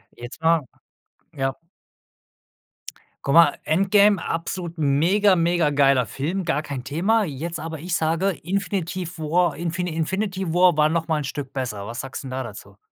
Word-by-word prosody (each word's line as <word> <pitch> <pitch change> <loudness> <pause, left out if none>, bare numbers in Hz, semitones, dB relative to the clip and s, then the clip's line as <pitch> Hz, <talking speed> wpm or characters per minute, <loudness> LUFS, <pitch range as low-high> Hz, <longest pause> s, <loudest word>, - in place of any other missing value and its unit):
Jetzt 120 +6 -10
mal 165 -1 +3 0.7
ja. 135 -2 -2 1.7
Guck 140 - 0
mal, 165 -4 +7
Endgame, 195 +4 +4
absolut 170 0 -4
mega, 175 +8 +3
mega 170 -2 +2
geiler 135 -4 +3
Film, 170 - -3
gar 160 -2 -1
kein 135 -5 -5
Thema. 195 +10 +1
Jetzt 165 +2 -5
aber 160 0 -5
ich 170 +1 -2
sage: 165 +5 +1
„Infinitiv 180 -2 -3
War 165 +2 +1
Infi 170 +1 -3
Infinity 185 +2 -2
War 170 -3 +4
noch 165 +1 -1
mal 155 -2 +1
'n - - -3
Stück 140 -1 -6
besser." 115 -7 -4
Was 115 +2 -6
sagst 135 +1 -6
'n 130 - -7
da 130 - -3
dazu? 100 -3 -11
165 Hz, 155 wpm, -23 LUFS, 140-180 Hz, 1.7 s, mal